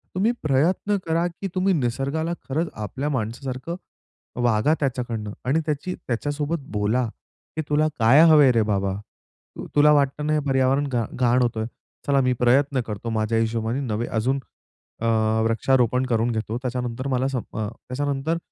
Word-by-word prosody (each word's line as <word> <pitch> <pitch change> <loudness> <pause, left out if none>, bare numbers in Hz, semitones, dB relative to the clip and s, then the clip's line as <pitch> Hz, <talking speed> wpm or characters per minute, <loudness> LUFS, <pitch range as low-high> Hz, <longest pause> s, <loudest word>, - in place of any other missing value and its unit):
तुम्ही 205 +5 +2
प्रयत्न 165 +8 +2
करा, 165 +1 +1
की 175 +3 -6
तुम्ही 185 +1 +2
निसर्गाला 140 +4 -1 0.2
खरंच 160 +5 0
आपल्या 130 +8 -4
माणसासारखं 130 +5 -3 0.7
वागा 120 +5 +3
त्याच्याकडनं 120 -6 -2
आणि 140 +6 +2
त्याची 155 +4 -2
त्याच्यासोबत 145 +6 -2
बोला, 105 +4 +1 0.5
की 160 - -1
"तुला 150 +1 +3
काय 125 +7 +6
हवंय 150 -4 +7
रे, 115 -2 +3
बाबा?" 100 -2 0 0.6
तु - - -7
तुला 150 +1 +6
वाटतं 145 0 +1
ना, 155 - +2
हे 155 - +3
पर्यावरण 135 +2 +2
घा 120 -3 0
घाण 125 0 +2
होतोय, 115 -2 0 0.4
चला 140 -1 +4
मी 125 0 +2
प्रयत्न 135 +2 +3
करतो 105 +2 -5
माझ्या 110 0 0
हिशोबाने 115 +2 -1
नवे 120 -4 -2
अजून 125 +5 0 0.6
अ, - - -1 0.4
वृक्षारोपण 125 +2 +2
करून 120 -1 +1
घेतो 110 0 -2
त्याच्यानंतर 125 0 -3
मला 130 -1 +1
सम 135 -3 -2 0.2
अ, 110 -1 -1
त्याच्यानंतर 140 +6 -3
130 Hz, 150 wpm, -24 LUFS, 115-145 Hz, 0.7 s, हवंय